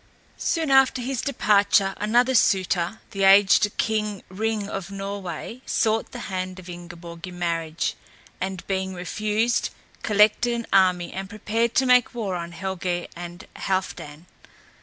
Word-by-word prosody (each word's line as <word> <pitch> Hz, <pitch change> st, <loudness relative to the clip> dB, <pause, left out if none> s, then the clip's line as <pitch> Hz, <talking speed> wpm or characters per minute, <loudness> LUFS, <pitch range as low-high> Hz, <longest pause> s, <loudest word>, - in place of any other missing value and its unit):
Soon 320 Hz, -4 st, 0 dB
after 270 Hz, -1 st, +5 dB
his 250 Hz, 0 st, -2 dB
departure 205 Hz, -6 st, +3 dB
another 240 Hz, +5 st, +2 dB
suitor, 190 Hz, -3 st, +2 dB
the 195 Hz, -, -4 dB
aged 200 Hz, +1 st, +6 dB
King 210 Hz, -2 st, -1 dB
Ring 215 Hz, +1 st, -2 dB
of 195 Hz, -2 st, -5 dB
Norway 195 Hz, +3 st, -6 dB
sought 220 Hz, 0 st, +1 dB
the 240 Hz, -, -7 dB
hand 185 Hz, -2 st, -4 dB
of 185 Hz, -1 st, -11 dB
Ingeborg 175 Hz, 0 st, -9 dB
in 180 Hz, -1 st, -9 dB
marriage, 165 Hz, -2 st, -1 dB, 0.5 s
and 190 Hz, -1 st, -4 dB
being 190 Hz, -1 st, -2 dB
refused, 215 Hz, +6 st, 0 dB, 0.3 s
collected 215 Hz, +3 st, +3 dB
an 235 Hz, -1 st, -4 dB
army 180 Hz, -2 st, +3 dB
and 190 Hz, 0 st, -5 dB
prepared 225 Hz, +2 st, -1 dB
to 265 Hz, -, +4 dB
make 250 Hz, -1 st, +4 dB
war 210 Hz, -5 st, -2 dB
on 170 Hz, -1 st, -4 dB
Helgé 180 Hz, 0 st, -3 dB
and 175 Hz, +1 st, -8 dB
Halfdan. 175 Hz, -5 st, -3 dB
195 Hz, 140 wpm, -24 LUFS, 180-220 Hz, 0.5 s, aged